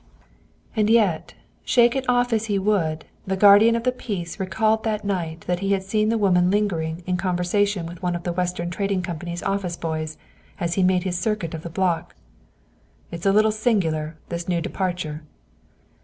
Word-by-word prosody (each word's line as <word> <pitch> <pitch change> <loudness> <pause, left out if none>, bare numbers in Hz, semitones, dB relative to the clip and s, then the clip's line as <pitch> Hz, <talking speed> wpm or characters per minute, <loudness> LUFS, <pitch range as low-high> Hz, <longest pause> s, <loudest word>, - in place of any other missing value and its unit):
And 215 -1 +2
yet, 210 -8 +2 0.3
shake 240 0 +4
it 265 -1 -2
off 245 -1 +2
as 220 0 +1
he 205 -2 0
would, 185 -6 0 0.2
the 190 0 -1
guardian 205 +3 +7
of 230 - -2
the 250 - +2
peace 200 -9 -5
recalled 215 +4 +1
that 215 -2 -2
night 170 -5 -2
that 180 0 -2
he 195 +1 +1
had 195 -1 0
seen 215 +2 +1
the 230 - +2
woman 180 -4 +3
lingering 175 -5 -1
in 180 0 0
conversation 180 +1 0
with 170 0 -9
one 180 -1 -1
of 175 - -5
the 175 - -2
Western 175 -1 -2
Trading 195 -1 -1
Company's 175 0 -5
office 195 -3 -2
boys, 155 -1 -4 0.4
as 170 0 -1
he 190 - +1
made 185 -1 +3
his 180 -2 -2
circuit 200 -5 -2
of 160 - -5
the 170 - -7
block. 175 -1 -1 1.0
"It 170 - -4
is 180 - -2
a - - +5
little 215 +2 +4
singular, 165 -9 0
this 170 +1 -4
new 175 -1 +1
departure." 175 -4 -3
185 Hz, 185 wpm, -23 LUFS, 170-210 Hz, 1.0 s, guardian